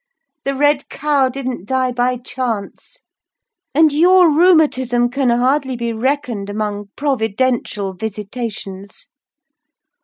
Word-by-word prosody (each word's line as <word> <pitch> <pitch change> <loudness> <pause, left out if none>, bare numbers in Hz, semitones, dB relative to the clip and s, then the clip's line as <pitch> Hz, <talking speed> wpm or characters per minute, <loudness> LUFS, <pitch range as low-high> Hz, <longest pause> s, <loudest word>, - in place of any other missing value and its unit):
The 275 0 -1
red 290 0 +1
cow 285 -3 +1
didn't 255 -7 -5
die 260 0 0
by 250 +1 0
chance; 245 - -5 0.7
and 310 -1 +5
your 355 +2 +5
rheumatism 285 -8 +3
can 270 -1 0
hardly 260 +3 +1
be 235 -1 -3
reckoned 240 -4 -2
among 205 -1 -4
providential 235 -6 -1
visitations!" 205 - -6
250 Hz, 100 wpm, -18 LUFS, 220-280 Hz, 0.7 s, and